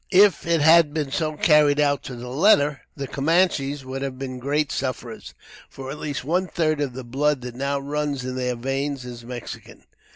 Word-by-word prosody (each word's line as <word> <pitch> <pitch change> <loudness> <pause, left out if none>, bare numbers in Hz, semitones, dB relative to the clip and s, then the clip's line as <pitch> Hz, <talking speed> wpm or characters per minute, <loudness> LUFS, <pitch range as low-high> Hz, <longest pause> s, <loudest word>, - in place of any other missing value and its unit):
If 190 -4 +5
it 165 -2 +2
had 160 -1 +6
been 150 -4 -2
so 155 +1 -1
carried 150 -2 +4
out 145 -1 +2
to 130 - -6
the 120 +1 -8
letter, 145 0 +3
the 140 -2 -5
Camanches 145 -3 +1
would 130 +1 -5
have 135 -2 -4
been 130 -1 -6
great 145 +3 0
sufferers, 125 -4 -5 0.3
for 135 0 -8
at 150 - -7
least 145 -4 -4
one 180 +6 0
third 155 -3 0
of 140 -4 -2
the 130 +1 -7
blood 135 +3 0
that 125 -1 -7
now 140 +3 -1
runs 145 -1 -3
in 130 0 -4
their 125 -1 -1
veins 135 +2 -3
is 120 -1 -9
Mexican. 120 0 -9
140 Hz, 195 wpm, -23 LUFS, 130-150 Hz, 0.3 s, had